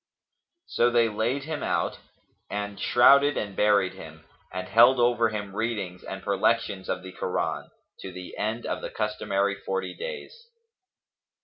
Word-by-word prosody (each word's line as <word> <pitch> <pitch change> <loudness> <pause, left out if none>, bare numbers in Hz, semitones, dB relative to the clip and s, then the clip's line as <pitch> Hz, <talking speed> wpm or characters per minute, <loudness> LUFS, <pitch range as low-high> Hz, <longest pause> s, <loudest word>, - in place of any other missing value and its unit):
So 120 - +2
they 120 -1 +3
laid 115 +6 -1
him 155 0 -4
out - - -1 0.5
and 105 0 -4
shrouded 140 +4 +5
and 100 -2 -3
buried 105 -3 +3
him 80 0 -12 0.3
and 95 0 -5
held 120 +3 +6
over 120 -1 +3
him 100 -2 -5
readings 105 -6 -3
and 95 0 -7
perlections 100 -1 0
of 90 - -2
the 95 - -8
Koran, - - -3 0.3
to 95 - -7
the 90 0 -9
end 110 +3 -2
of - - -3
the - - -5
customary 100 -2 -1
forty 95 -1 -4
days. 475 0 -8
105 Hz, 145 wpm, -26 LUFS, 95-120 Hz, 0.5 s, held